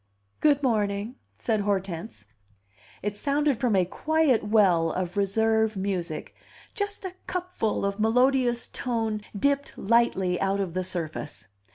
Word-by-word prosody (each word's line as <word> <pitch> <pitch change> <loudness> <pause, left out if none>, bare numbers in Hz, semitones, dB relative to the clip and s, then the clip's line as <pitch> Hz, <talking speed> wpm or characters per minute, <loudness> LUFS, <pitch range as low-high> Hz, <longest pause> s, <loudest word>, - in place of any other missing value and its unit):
"Good 290 -2 +3
morning," 215 0 0 0.2
said 220 -2 0
Hortense. 195 - -3 0.8
It 205 0 -2
sounded 285 -1 +1
from 240 -5 +2
a 185 -2 +4
quiet 305 - +1
well 190 -6 +3
of 180 +1 -3
reserve 220 +2 +2
music; 185 -5 -3 0.4
just 405 -2 -4
a 370 - -4
cupful 360 - -2
of 200 +1 -2
melodious 245 +2 +2
tone 225 -3 -2 0.2
dipped 280 +5 0
lightly 195 -5 +2
out 195 +1 +1
of 190 -4 -2
the 185 +1 -1
surface. 150 - -5
215 Hz, 130 wpm, -26 LUFS, 190-255 Hz, 0.8 s, a